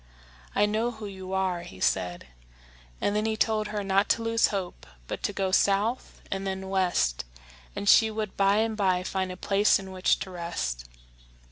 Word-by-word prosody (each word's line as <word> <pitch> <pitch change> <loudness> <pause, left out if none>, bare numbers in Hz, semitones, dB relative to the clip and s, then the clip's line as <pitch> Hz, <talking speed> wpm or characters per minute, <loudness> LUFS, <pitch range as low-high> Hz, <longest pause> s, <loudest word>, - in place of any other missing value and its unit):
"I 205 - +4
know 220 +3 0
who 220 -3 -8
you 190 -2 -8
are," 190 -2 0
he 95 - -11
said; 90 -1 0 0.7
and 205 - 0
then 215 +1 +1
he 220 0 -1
told 215 -1 +1
her 210 -1 -3
not 195 +1 +2
to 230 - +2
lose 230 0 +3
hope, 190 -3 -5 0.2
but - - -5
to - - -1
go 190 -1 -1
south 205 +6 +1
and 195 0 -2
then 190 0 -4
west, 180 - +1 0.5
and 200 - -4
she 220 +2 +7
would 215 -2 -4
by 195 0 +3
and 220 0 +1
by 185 -3 +1
find 190 0 -2
a 180 - -7
place 200 +2 +3
in 190 -1 -8
which 185 0 +2
to 190 - -5
rest. 170 - -4
195 Hz, 190 wpm, -27 LUFS, 185-215 Hz, 0.7 s, she